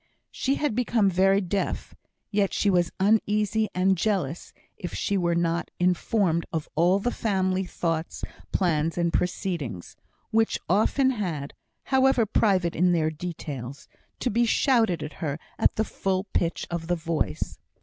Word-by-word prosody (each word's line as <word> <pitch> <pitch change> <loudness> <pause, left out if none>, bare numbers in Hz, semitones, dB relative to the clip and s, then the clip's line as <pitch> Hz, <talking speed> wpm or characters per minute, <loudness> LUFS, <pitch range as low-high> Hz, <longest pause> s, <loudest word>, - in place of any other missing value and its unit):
She 275 +1 0
had 295 -5 0
become 225 -4 +2
very 195 +2 +4
deaf; 195 +1 -2 0.4
yet 200 -2 +1
she 200 - +2
was 175 -2 +2
uneasy 210 +1 +2
and 190 +1 +3
jealous 175 -5 -1 0.2
if 175 - -6
she 200 - -1
were 170 -3 +1
not 170 0 0
informed 180 -1 +2
of 160 -2 -3
all 175 +4 +3
the 240 +5 -1
family 190 -4 0
thoughts, 165 -2 -3 0.3
plans, 165 -3 +1
and 170 -1 +1
proceedings, 160 - -2 0.4
which 225 0 +2
often 260 +5 +3
had 170 - -3 0.3
(however 265 -3 +3
private 190 -5 +2
in 180 +2 +3
their 160 -2 +1
details) 145 -6 -6 0.3
to 250 - 0
be 235 +3 +3
shouted 230 - +2
to 150 - -6
her 145 -3 -2 0.2
at - - +3
the 220 - +1
full 190 -2 -1
pitch 170 0 0
of 170 -1 -3
the 175 - +1
voice. 165 -1 -2
185 Hz, 150 wpm, -26 LUFS, 170-210 Hz, 0.4 s, very